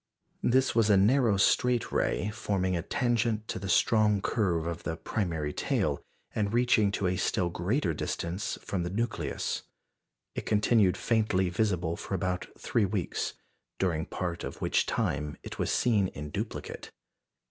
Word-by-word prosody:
This 130 +2 +3
was 115 -2 +3
a 100 - +6
narrow 110 +1 +4
straight 125 +5 +2
ray, 105 - 0
forming 95 -4 -1
a 85 - 0
tangent 115 - 0
to - - -2
the 95 0 -5
strong 105 +1 +4
curve 90 -6 0
of 85 0 -3
the 80 -1 -3
primary 80 -4 -2
tail, - - 0 0.3
and 105 -2 0
reaching 115 -4 +3
to 100 - -1
a 90 0 +1
still 90 -2 +1
greater 90 - 0
distance 85 +5 -3
from 95 - -2
the 85 - -2
nucleus. 115 +5 -2 0.7
It - - -5
continued 105 -2 +3
faintly 105 -5 +1
visible 90 -3 0
for 95 - -4
about 90 0 -2
three 110 - +1
weeks, 95 -3 -2 0.4
during 85 -4 0
part 85 -2 -3
of - - -6
which - - +1
time 75 +1 -1
it - - -8
was - - 0
seen 105 -6 +3
in 75 -4 -7
duplicate. - - -5
100 Hz, 155 wpm, -29 LUFS, 90-110 Hz, 0.7 s, a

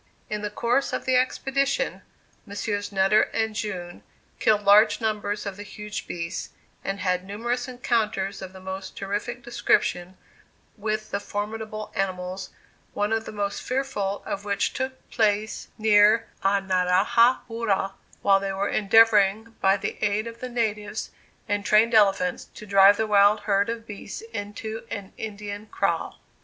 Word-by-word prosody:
In 210 -1 -2
the 210 - -2
course 245 +6 0
of - - -2
the 260 - +2
expedition, 270 +2 0 0.5
Messrs. 205 0 -3
Nutter 195 +2 +4
and 220 -1 0
June 185 -5 -5 0.4
killed 210 -1 +3
large 205 +2 +6
numbers 210 -2 -2
of 200 -1 -5
the - - -7
huge 210 0 -7
beasts, 170 +1 -4 0.3
and 195 0 -3
had 180 -1 0
numerous 240 +6 -3
encounters 220 -6 -1
of 190 -1 -7
the 190 - -12
most 190 +1 -7
terrific 210 +5 -4
description 185 -6 0 0.6
with 215 0 -3
the 200 - -1
formidable 215 +1 -5
animals, 185 -1 -3 0.5
one 205 +2 0
of 225 0 -1
the - - -6
most 205 -1 -3
fearful 250 -7 -2
of 200 - -4
which 200 -1 0
took 260 0 -5
place 215 -1 0
near 215 +1 +5 0.2
Anarajah 195 +5 +3
Poora, 210 -4 -1 0.3
while 195 -1 +5
they 195 0 -3
were 195 +1 -1
endeavoring, 215 +1 +4
by 195 +1 +4
the 195 - -5
aid 210 +1 +1
of 230 0 -8
the 255 - -5
natives 215 -3 -2 0.4
and 205 0 -1
trained 220 +3 +4
elephants, 195 -4 +3
to 215 - -9
drive 200 0 +6
the 220 - +1
wild 205 0 +5
herd 205 0 +1
of 230 -1 -4
beasts 210 -1 -8
into 210 +1 -5
an 200 -3 -6
Indian 210 -1 -6
kraal. - - -1
205 Hz, 150 wpm, -25 LUFS, 195-225 Hz, 0.6 s, large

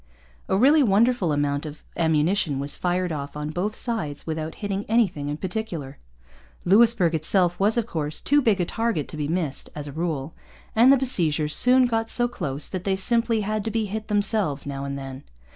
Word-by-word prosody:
A 190 - +2
really 285 +8 +5
wonderful 225 - +2
amount 145 -1 0
of 150 0 -10
ammunition 160 0 +1
was 140 +1 0
fired 180 0 -1
off 145 -1 -5
on 150 0 -4
both 195 +6 -2
sides 155 - -2
without 160 0 -4
hitting 200 -1 -3
anything 210 -11 +1
in 145 - -3
particular. 180 -7 -5 0.7
Louisbourg 205 -2 +4
itself 175 +3 +1
was, 210 +4 +2
of 235 - +1
course, 155 -7 -4
too 290 +1 +3
big 220 -6 +2
a 175 - +1
target 225 - -2
to - - -7
be 150 -1 -2
missed, 160 -4 -3
as 150 -1 -6
a 145 - -7
rule; 155 -2 -3 0.4
and 240 +4 +6
the 275 - +6
besiegers 160 - +1
soon 255 +1 +5
got 225 -2 -1
so 240 - +2
close 145 - -4
that 185 -2 -5
they 195 -1 0
simply 230 +3 +1
had 215 +1 -2
to 225 - -2
be 220 0 -1
hit 215 +2 -5
themselves 205 -8 0
now 140 -1 -5
and 140 0 -4
then. 135 0 -8
180 Hz, 195 wpm, -24 LUFS, 150-220 Hz, 0.7 s, and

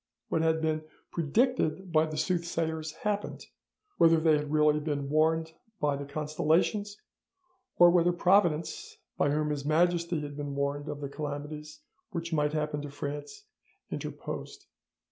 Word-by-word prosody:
What 160 - +1
had 160 0 +2
been 155 0 0 0.3
predicted 190 - +1
by 155 0 +4
the 155 -1 -5
soothsayers 160 -1 -1
happened, 205 +4 -3 0.5
whether 165 -1 +6
they 160 -1 +4
had 150 -1 -2
really 150 0 +4
been 145 -2 -2
warned 160 +1 +2 0.3
by 145 -1 +1
the 140 0 -5
constellations, 160 +8 0 0.8
or 175 0 +8
whether 175 0 +4
Providence 175 -3 +2 0.2
by 145 - +2
whom 150 +1 0
His 145 -2 -2
Majesty 170 +2 +2
had 145 -1 -6
been 145 -1 -4
warned 140 +1 -2
of 145 0 -5
the 140 - -3
calamities 150 - -6 0.3
which 165 0 -4
might 150 -1 +1
happen 150 -1 -1
to 145 - -6
France 145 - -6 0.5
interposed. 410 -1 -6
155 Hz, 145 wpm, -29 LUFS, 150-170 Hz, 0.8 s, or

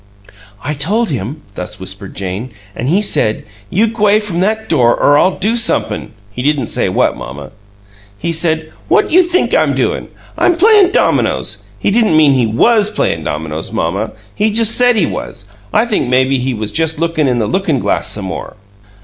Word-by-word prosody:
"I 150 - -2
told 200 +9 0
him," 135 +5 -5
thus 90 - -7
whispered 95 +1 -7
Jane, 100 +5 -4 0.3
"an' 125 - -4
he 190 +8 +2
said, 110 - +1 0.3
'You 210 +5 +2
g'way 215 -2 +2
from 205 -5 -3
that 220 +3 0
door 120 -7 +3
or 145 - +4
I'll 185 +5 +2
do 215 +4 +1
somep'm' 230 - 0 0.2
he 125 - -6
didn't 140 -3 0
say - - +1
what, - - +1
mamma. 70 +2 -9 0.7
He 170 - -3
said, 160 -1 0 0.2
'What - - +2
you 360 +4 +6
think 355 +1 0
I'm - - +2
doin'? - - -1 0.3
I'm 350 - +3
playin' 410 +1 +5
dominoes.' - - 0
He - - 0
didn't 215 -7 +3
mean 150 -3 +5
he 125 -3 +2
WAS 210 - +3
playin' 80 - -1
dominoes, 80 +1 -4
mamma. 100 +6 -2 0.2
He 215 - +1
just 225 +1 +3
said 245 -1 +3
he 200 -7 +2
was. 100 - -6 0.3
I 220 - +2
think 215 - -1
maybe 130 +1 +2
he 130 0 -2
was 110 -1 -4
just 160 -1 0
lookin' 165 -2 0
in 125 -2 +1
the 115 - 0
lookin' 165 - 0
glass - - 0
some 105 -2 +1
more." 95 - -6
155 Hz, 185 wpm, -14 LUFS, -, 0.7 s, you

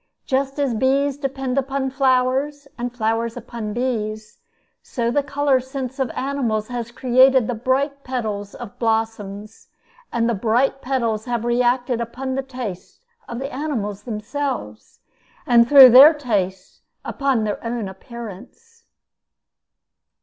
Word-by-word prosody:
Just 270 +1 -1
as 280 -4 0
bees 270 +4 +1
depend 270 -1 -2
upon 270 0 -2
flowers, 270 +2 +1
and 245 0 -4
flowers 230 0 -1
upon 230 -2 -6
bees, 215 -3 -3 0.4
so 235 -2 -2
the 290 - +2
color 280 -1 +1
sense 260 0 -6
of 265 -3 0
animals 250 -6 -2
has 240 -2 -4
created 255 +1 +4
the 245 - -2
bright 275 +4 -1
petals 215 -6 -4
of 240 -5 -10
blossoms; 220 -2 -3 0.4
and 230 -1 0
the 235 - +1
bright 240 +6 +1
petals 235 -5 -1
have 240 -2 -2
reacted 245 0 +1
upon 260 +3 -4
the 270 - -1
tastes 250 - -8 0.3
of 235 - -5
the 270 +3 -5
animals 230 -9 -3
themselves, 250 +6 -5 0.4
and 240 -3 +5
through 275 -3 +10
their 280 +6 +9
tastes 205 -9 -3 0.2
upon 270 -5 0
their 210 -1 -3
own 230 -3 -3
appearance. 235 - -11
245 Hz, 130 wpm, -21 LUFS, 225-270 Hz, 0.4 s, through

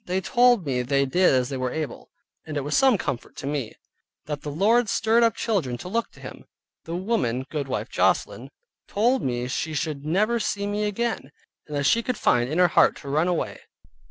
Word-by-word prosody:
They 185 +1 0
told 240 0 +3
me 130 -3 0
they 140 +2 +1
did 180 +7 +3
as 125 -2 +1
they 135 - -3
were 130 0 -1
able, 155 -2 -5 0.3
and 155 -2 -5
it 140 - -1
was 145 - -1
some 265 -4 +5
comfort 125 -9 -5
to - - -7
me, 140 -5 -3 0.5
that 150 -1 -4
the 150 - -5
Lord 215 +9 +2
stirred 225 +2 +2
up 230 -2 +3
children 165 - -1
to 180 - -8
look 230 +5 -1
to - - -17
Him. - - -10 0.4
The 165 - -4
woman, 180 - -1
viz. - - -21
goodwife 140 -4 -3
Joslin, - - 0 0.4
told 245 +5 +1
me 120 -1 -2
she 155 +4 -3
should 145 -1 -3
never 210 +9 +1
see 200 -2 -2
me 205 +1 -1
again, 210 - -2 0.4
and 150 -1 -4
that 140 - 0
she 230 +10 +4
could 250 -1 -3
find 120 -8 +2
in 155 - -2
her 180 -1 +5
heart - - +4
to 140 - -8
run 155 +5 +1
away. 175 -2 -2
165 Hz, 215 wpm, -24 LUFS, 140-215 Hz, 0.5 s, some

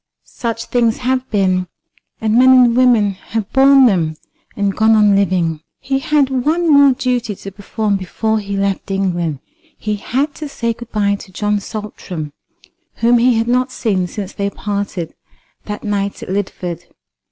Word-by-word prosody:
Such 230 -1 -4
things 235 -2 +1
have 255 +1 -1
been; 185 -3 +1 0.5
and 220 -1 0
men 255 +3 +6
and 245 -2 +5
women 240 -5 +4
have 200 +2 -5
borne 270 0 +6
them, 170 -8 +1 0.4
and 200 -1 -1
gone 220 +1 +4
on 210 -2 +4
living." 175 -5 +1 0.2
He 270 0 -1
had 290 -2 +1
one 325 +2 +2
more 280 -1 +6
duty 245 -4 -1
to 195 - -9
perform 205 +1 -2
before 220 +4 -1
he 200 -1 -4
left 195 0 -1
England. 175 -7 -1 0.4
He 210 -1 -3
had 275 +8 -1
to 305 -2 -7
say 235 -4 -2
good 240 +1 -12
bye 200 -1 +1
to 190 - -12
John 210 +2 -1
Saltram, 190 -7 -7 0.6
whom 235 +1 +3
he 245 0 +4
had 225 +1 0
not 250 +1 +1
seen 195 -8 -1
since 195 +1 -6
they 200 -1 -2
parted 200 -5 -4 0.5
that 210 0 -6
night 200 -1 -2
at - - -9
Lidford. 185 -3 -3
210 Hz, 165 wpm, -17 LUFS, 195-245 Hz, 0.6 s, men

